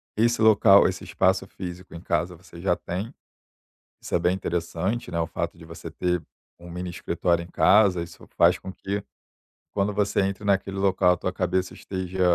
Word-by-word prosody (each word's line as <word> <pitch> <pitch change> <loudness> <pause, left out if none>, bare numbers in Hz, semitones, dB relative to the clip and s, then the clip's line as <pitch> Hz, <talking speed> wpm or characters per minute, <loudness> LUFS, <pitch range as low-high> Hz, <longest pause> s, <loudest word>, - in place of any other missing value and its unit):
esse 115 +2 +2
local 100 -2 +7
esse - - -4
espaço 95 +1 +1
físico 90 -1 -8
em 85 - -8
casa 85 +1 -1
você 85 0 -13
já 90 -1 +2
tem. 100 +10 -5 0.9
Isso - - -8
é - - +3
bem 90 +1 +2
interessante, 90 +5 -2
né, 85 - -1
o 80 - +1
fato 85 0 -4
de 85 - -13
você 85 0 -9
ter 90 +1 -1 0.4
um 85 0 -12
mini 90 +1 -5
escritório 85 -1 0
em - - -11
casa. 95 -4 +4
Isso 85 - -13
faz - - +5
com 95 - -7
que 100 +1 -4 0.7
quando 100 +1 +1
você 105 0 +1
entra 95 +1 -2
naquele 100 -1 +1
local, 95 -2 +3
a - - -7
tua 95 - -3
cabeça 90 0 -1
esteja 95 -1 -5
90 Hz, 185 wpm, -25 LUFS, 85-100 Hz, 0.9 s, local